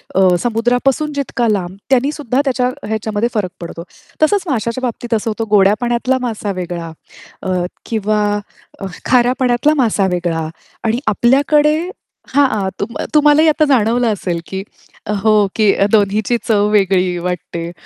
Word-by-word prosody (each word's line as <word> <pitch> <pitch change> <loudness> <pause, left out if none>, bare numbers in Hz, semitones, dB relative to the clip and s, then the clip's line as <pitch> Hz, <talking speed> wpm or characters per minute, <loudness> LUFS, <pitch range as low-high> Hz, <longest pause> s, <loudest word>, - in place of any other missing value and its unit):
अ, 185 -1 +4
समुद्रापासून 245 +6 0
जितका 275 -4 -1
लांब 190 -3 -1
त्यानी 270 +2 +3
सुद्धा 280 -3 -1
त्याच्या 255 -2 +1 0.2
ह्याच्यामध्ये, 220 +1 -1
फरक 195 -5 -1
पडतो. 170 0 -7 0.4
तसंच 395 +5 +3
माशाच्या 235 -1 -1
बाबतीत 240 -1 -3
असं 225 +1 0
होतं 225 0 -3
गोड्या 200 -1 +5
पाण्यातला 240 +2 +1
मासा 220 -4 -3
वेगळा 170 -1 -5 0.5
अ, 185 - -2 0.3
किंवा 215 -1 0 0.6
अ, 195 - -5 0.2
खाऱ्या 250 0 +3
पाण्यातला 250 +3 +2
मासा 205 -4 +1
वेगळा 170 -3 -1 0.4
आणि 230 +1 0
आपल्याकडे 290 +7 +3 0.5
हां, 220 -9 +2
तुम 230 +4 -4 0.2
तुम्हाला 295 0 +5
ही 320 - +4
आता 310 0 +3
जाणवलं 245 -2 +2
असेल, 180 -4 -3
की 190 0 -4 0.6
हो, 215 -2 +4
की 215 -2 +4 0.2
दोन्हीची 215 +2 +2
चव 210 -2 +3
वेगळी 185 -3 +2
वाटते. 170 -1 -4
225 Hz, 140 wpm, -16 LUFS, 195-255 Hz, 0.6 s, गोड्या